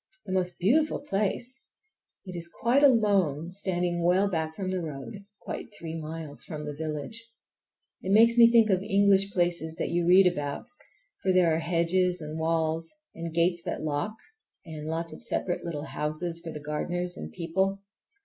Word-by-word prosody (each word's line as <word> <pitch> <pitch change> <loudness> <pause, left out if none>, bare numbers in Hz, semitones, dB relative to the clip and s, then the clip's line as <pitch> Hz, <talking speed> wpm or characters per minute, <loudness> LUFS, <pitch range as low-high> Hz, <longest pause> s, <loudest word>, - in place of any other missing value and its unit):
The 190 - -6
most 180 -1 -1
beautiful 300 - +2
place! 240 +2 -2 0.6
It 185 -2 -7
is 170 -1 -5
quite 240 +9 +1
alone, 195 - +3
standing 175 -2 -1
well 185 +3 +4
back 160 -4 -2
from 185 0 -3
the 185 -1 -1
road, 150 +3 -7 0.2
quite - - -6
three 165 -1 -6
miles 160 -2 -6
from 150 -3 -6
the 150 - -4
village. 155 +8 -5 0.8
It 190 - -3
makes 230 +3 +6
me 235 -1 +7
think 225 -3 +5
of 185 -1 +2
English 195 0 +3
places 175 -3 +1
that - - -2
you 170 0 +1
read 185 +2 +7
about, 145 -3 -1 0.6
for 190 - +2
there 180 -3 +4
are 160 - +1
hedges 175 +2 +1
and 155 0 -6
walls 160 0 0 0.2
and 165 0 -5
gates 170 +1 +1
that - - -3
lock, 150 +7 -2 0.5
and 155 -2 -7
lots 165 +1 -3
of - - -10
separate 190 -6 -2
little 155 -3 -4
houses 160 +3 -3
for 165 - -5
the 150 - -6
gardeners 175 +4 -2
and 80 - -7
people. 190 - -1
175 Hz, 170 wpm, -28 LUFS, 160-195 Hz, 0.8 s, me